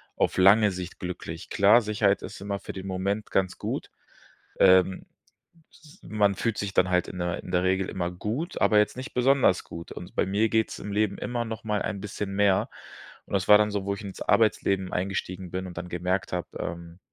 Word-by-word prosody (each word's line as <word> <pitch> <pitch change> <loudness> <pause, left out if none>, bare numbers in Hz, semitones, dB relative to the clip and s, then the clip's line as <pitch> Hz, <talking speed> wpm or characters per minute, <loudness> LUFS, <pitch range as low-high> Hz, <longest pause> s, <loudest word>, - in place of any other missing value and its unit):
auf - - 0
lange 100 +2 +6
Sicht 90 -1 -7
glücklich. 90 0 -6
Klar, 105 +5 +5
Sicherheit 105 -2 +1
ist - - -8
immer 100 0 -3
für - - -7
den 95 0 -7
Moment 100 +3 -2
ganz 95 -1 0
gut. - - -4 0.7
Ähm, 95 0 +5 0.7
s 155 +4 -19
man 100 -2 +1
fühlt 115 -3 -1
sich 100 -1 -3
dann 90 0 +3
halt 90 -1 +2
in 90 - -7
der 85 0 -2
in - - -8
der 90 0 +2
Regel 95 0 +1
immer 90 -1 -2
gut, 110 - -4
aber 105 - +4
jetzt 105 +3 +2
nicht 130 - -7
besonders 125 -7 +3
gut. 85 0 -9
Und 90 - -10
bei - - +2
mir 105 +3 +1
geht's 110 0 0
im 105 - -6
Leben 105 -1 +1
immer 120 -1 -2
noch 110 -1 -6
mal 105 -1 0
ein 100 - -3
bisschen 100 -1 -5
mehr. 100 -1 +3 0.6
Und - - -7
das 95 -1 +1
war 105 - +10
dann 105 0 +2
so, 100 -2 -2
wo 100 - 0
ich 100 - -9
ins 100 -2 -8
Arbeitsleben 100 -4 +2
eingestiegen 95 -1 -3
bin 95 0 -3
und 85 - -8
dann 90 +1 -6
gemerkt 90 +2 -2
habe, 90 -1 -3
ähm, 85 +1 -6
100 Hz, 210 wpm, -26 LUFS, 90-105 Hz, 0.7 s, war